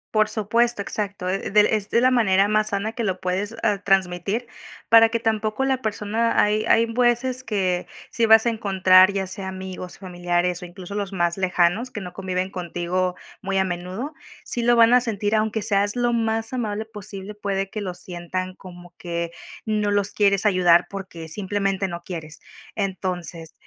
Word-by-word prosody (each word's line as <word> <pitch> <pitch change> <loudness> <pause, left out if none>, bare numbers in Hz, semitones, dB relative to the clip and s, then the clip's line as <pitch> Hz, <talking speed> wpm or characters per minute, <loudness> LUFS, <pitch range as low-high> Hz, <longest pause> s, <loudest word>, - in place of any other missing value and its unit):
Por 215 0 +4
supuesto, 225 +1 +1
exacto. 200 -2 -4
Eh, 195 +1 -2
del 210 0 +6
es 210 -2 0
de 235 - +3
la 255 - +5
manera 200 -6 +3
más 215 0 +2
sana 205 +3 -2
que 235 - -3
lo 190 -3 -1
puedes, 190 +4 -2
ah, 210 -3 +2
transmitir 195 +4 0 0.4
para 225 0 +7
que 230 +1 -1
tampoco 220 +2 0
la 265 -1 0
persona 220 +2 0
hay 210 +1 +2
hay 230 - +5
veces 245 +2 +1
que 185 -6 -1 0.3
sí 230 - +1
vas 220 0 +6
a 235 - +4
encontrar, 190 -3 +5
ya 195 -1 -2
sea 190 0 -4
amigos, 185 -1 -7
familiares, 175 -1 -1
o - - -6
incluso 180 +2 -9
los 200 -1 -3
más 175 -2 0
lejanos, 185 +6 +1
que 215 - -5
no 180 -2 -8
conviven 185 0 -3
contigo 180 0 -2 0.3
muy 195 0 -2
a 190 - +3
menudo, 185 - -5 0.3
sí 240 - -1
lo 240 0 +4
van 230 +1 +6
a 250 - +6
sentir, 215 -2 -1
aunque 220 0 0
seas 205 +1 0
lo 240 0 +1
más 225 0 -1
amable 220 -3 -2
posible, 210 -2 -8
puede 195 -1 -2
que 215 +1 -5
lo 185 -3 -4
sientan 180 +1 -5
como 175 -1 -13
que 170 -1 -4 0.3
no 210 -1 0
los 205 -1 +1
quieres 200 -1 +2
ayudar 180 -4 +4
porque 190 -5 -8
simplemente 195 +1 -2
no 170 0 -7
quieres. 155 -5 -7 0.4
Entonces, 180 -5 -4
200 Hz, 180 wpm, -23 LUFS, 185-220 Hz, 0.4 s, para